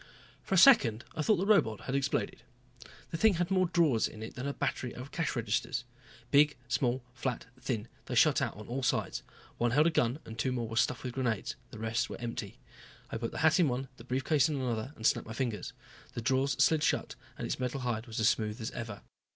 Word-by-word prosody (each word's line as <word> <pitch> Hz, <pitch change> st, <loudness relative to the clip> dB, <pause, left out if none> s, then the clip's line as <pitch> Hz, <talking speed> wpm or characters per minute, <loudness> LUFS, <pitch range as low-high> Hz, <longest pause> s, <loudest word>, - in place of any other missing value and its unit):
For 195 Hz, -, -1 dB
a -, -, +4 dB
second 140 Hz, -, +6 dB
I -, -, -1 dB
thought 210 Hz, +8 st, +4 dB
the 190 Hz, +1 st, -1 dB
robot 115 Hz, -, +3 dB
had 130 Hz, -, -4 dB
exploded. 140 Hz, 0 st, -1 dB, 0.7 s
The 165 Hz, -, -2 dB
thing 215 Hz, +1 st, +4 dB
had 175 Hz, +2 st, -1 dB
more 185 Hz, -1 st, +3 dB
drawers 160 Hz, -10 st, +3 dB
in 110 Hz, -, -9 dB
it 110 Hz, -, -7 dB
than 130 Hz, +2 st, -4 dB
a -, -, 0 dB
battery 125 Hz, -2 st, -2 dB
of 130 Hz, +3 st, -8 dB
cash 165 Hz, -3 st, -1 dB
registers. 115 Hz, +1 st, -1 dB, 0.5 s
Big, 145 Hz, 0 st, +5 dB
small, 125 Hz, 0 st, 0 dB
flat, 130 Hz, -1 st, -3 dB
thin, 120 Hz, -4 st, -3 dB, 0.2 s
they -, -, -3 dB
shot -, -, +5 dB
out -, -, -2 dB
on 105 Hz, -, -9 dB
all 130 Hz, +3 st, -3 dB
sides. 125 Hz, -, 0 dB, 0.4 s
One 120 Hz, -, +3 dB
held 145 Hz, +6 st, +4 dB
a 170 Hz, -, +4 dB
gun 125 Hz, -3 st, +1 dB
and 115 Hz, +1 st, -9 dB
two 130 Hz, -, +1 dB
more 120 Hz, -2 st, -2 dB
were 115 Hz, -, -6 dB
stuffed 115 Hz, +3 st, +1 dB
with 125 Hz, -2 st, -4 dB
grenades; 120 Hz, -5 st, -1 dB
the -, -, -10 dB
rest 115 Hz, +3 st, -1 dB
were -, -, -7 dB
empty. 115 Hz, -, -5 dB, 0.5 s
I -, -, -2 dB
put 115 Hz, 0 st, -3 dB
the -, -, -7 dB
hat 160 Hz, +4 st, +5 dB
in 170 Hz, -, +5 dB
one, 130 Hz, +1 st, -2 dB
the 115 Hz, -, -12 dB
brief 130 Hz, +2 st, -2 dB
case 150 Hz, -1 st, +3 dB
in 150 Hz, -, -1 dB
another 125 Hz, -2 st, -2 dB
and 110 Hz, -, -7 dB
snapped -, -, +2 dB
my 115 Hz, -, -6 dB
fingers. 120 Hz, -4 st, -3 dB, 0.4 s
The -, -, -3 dB
drawers 135 Hz, +3 st, +2 dB
slid 160 Hz, -2 st, +3 dB
shut -, -, 0 dB, 0.2 s
and -, -, -4 dB
its -, -, -3 dB
metal 130 Hz, +1 st, -2 dB
hide 120 Hz, -1 st, -2 dB
was 110 Hz, -1 st, -5 dB
as 110 Hz, -, +4 dB
smooth 110 Hz, -2 st, 0 dB
as 110 Hz, -, -4 dB
ever. 110 Hz, -4 st, -6 dB
125 Hz, 230 wpm, -31 LUFS, 115-140 Hz, 0.7 s, second